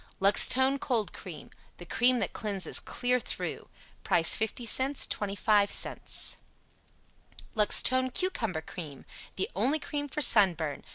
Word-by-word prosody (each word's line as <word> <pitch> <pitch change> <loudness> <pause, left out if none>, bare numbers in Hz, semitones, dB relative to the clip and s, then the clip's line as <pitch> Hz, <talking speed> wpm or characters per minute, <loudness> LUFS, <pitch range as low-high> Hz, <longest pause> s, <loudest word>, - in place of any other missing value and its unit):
LUXTONE 260 +7 +3
COLD 230 -8 -3
CREAM. 160 -6 -11 0.3
The 175 - -12
cream 245 +8 +2
that - - -4
cleanses 200 -6 -1
clear 250 0 -2
through. - - -5 0.3
Price 165 -1 +5
50c, 245 +5 -1
25c. 205 0 -1 1.2
LUXTONE 255 +4 +2
CUCUMBER 235 - -3
CREAM. 155 -3 -10 0.3
The 410 - -4
only 290 +4 +1
cream 290 -2 -6
for 300 +3 -4
sunburn. 175 - +4
225 Hz, 110 wpm, -28 LUFS, 190-260 Hz, 1.2 s, Price